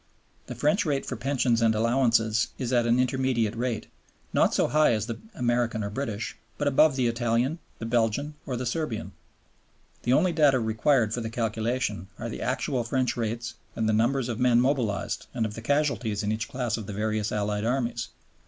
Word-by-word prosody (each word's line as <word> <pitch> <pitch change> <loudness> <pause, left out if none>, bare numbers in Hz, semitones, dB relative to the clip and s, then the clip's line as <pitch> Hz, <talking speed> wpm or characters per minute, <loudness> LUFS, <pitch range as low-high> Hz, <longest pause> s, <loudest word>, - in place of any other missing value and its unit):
The 125 - -6
French 150 - +2
rate 145 -4 -1
for - - -4
Pensions 130 -4 +1
and 110 -1 +3
Allowances 115 -1 +2
is 125 -1 -2
at 120 -1 +3
an 120 +2 +3
intermediate 125 -4 +1
rate, 120 -1 -2 0.5
not - - +4
so - - +2
high 155 -4 +4
as 110 -1 -1
the 115 -1 -5 0.2
American 120 -3 0
or 100 - -3
British, 110 -3 -3 0.2
but 145 - 0
above 145 +1 +5
the 130 -2 +1
Italian, 120 +6 0 0.2
the 115 - -6
Belgian, 120 +5 0
or 125 -3 -2
the 125 - -3
Serbian. 125 -2 -2 0.9
The 120 - +1
only 170 +5 +3
data 145 -5 +4
required 110 +1 +2
for 120 - -2
the 110 - -3
calculation 110 -3 -2
are - - -5
the - - -6
actual 125 -3 -1
French 130 +2 0
rates 115 0 -3 0.2
and 110 - 0
the 110 - +2
numbers 120 +4 +2
of 120 -1 -3
men 125 -1 +4
mobilized 125 -5 0
and 115 -3 +1
of 105 - -4
the 115 - -7
casualties 125 -6 0
in 105 - 0
each 110 0 -2
class 125 -4 -2
of 110 -4 -7
the 105 - -5
various 110 +1 -1
Allied 105 0 -1
Armies. 120 -1 -1
120 Hz, 190 wpm, -27 LUFS, 110-130 Hz, 0.9 s, above